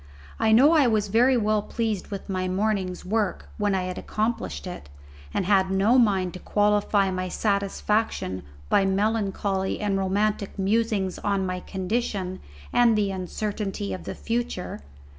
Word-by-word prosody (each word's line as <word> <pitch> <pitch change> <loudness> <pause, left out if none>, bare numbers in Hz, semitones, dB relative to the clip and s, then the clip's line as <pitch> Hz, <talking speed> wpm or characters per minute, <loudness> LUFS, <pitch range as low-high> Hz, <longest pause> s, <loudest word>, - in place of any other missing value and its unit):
I 220 - +3
know 260 +8 +7
I 305 -6 +5
was 215 -3 +1
very 245 +5 +4
well 215 -1 +2
pleased 220 -2 -2
with 200 -1 -6
my 185 -2 -1
morning's 190 -1 -1
work 215 +2 -1
when 205 -1 +1
I 185 - 0
had 180 0 -4
accomplished 220 0 -2
it, 180 - -8 0.4
and - - -1
had 190 -1 +3
no 200 +7 +4
mind 195 -6 +2
to 185 - -7
qualify 205 -1 +2
my 185 0 -2
satisfaction 200 - -1 0.3
by 195 - +3
melancholy 195 -1 0
and 200 -2 0
romantic 200 +1 0
musings 200 -1 0
on 200 -2 0
my 185 0 -2
condition 190 -1 -3 0.3
and 235 -3 +5
the 200 -2 +1
uncertainty 195 - -3
of 90 -3 -7
the - - -5
future. 235 -5 -3
200 Hz, 150 wpm, -25 LUFS, 190-220 Hz, 0.4 s, know